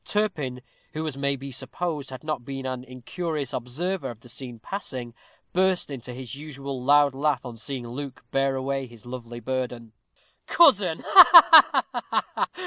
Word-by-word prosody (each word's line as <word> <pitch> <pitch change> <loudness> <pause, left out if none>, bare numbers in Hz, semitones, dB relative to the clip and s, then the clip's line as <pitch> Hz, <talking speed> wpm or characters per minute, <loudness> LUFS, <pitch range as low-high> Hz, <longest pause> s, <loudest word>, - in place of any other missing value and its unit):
Turpin, 150 -12 -2 0.3
who, 155 +1 -3
as 155 -4 -4
it - - -10
may 140 0 0
be 135 +1 -9
supposed, 150 +2 -4
had 130 -1 -9
not 155 -5 -3
been 135 0 -6
an 130 -1 -4
incurious 140 +4 -5
observer 145 +6 -3
of 120 -3 -9
the 125 - -15
scene 125 -1 -7
passing, 125 - -6 0.4
burst 185 -3 +1
into 125 -2 -7
his 125 -1 -8
usual 140 -3 -7
loud 145 0 +4
laugh 140 0 -1
on 120 -2 -7
seeing 125 +1 -6
Luke 130 +1 -8
bear 135 0 +1
away 135 0 -3
his 120 -2 -17
lovely 120 -1 -8
burden. 120 -2 -4 0.5
"Cousin! 205 - +4
Ha, 340 -3 +8
ha!" - - -2
135 Hz, 160 wpm, -25 LUFS, 125-155 Hz, 0.5 s, Ha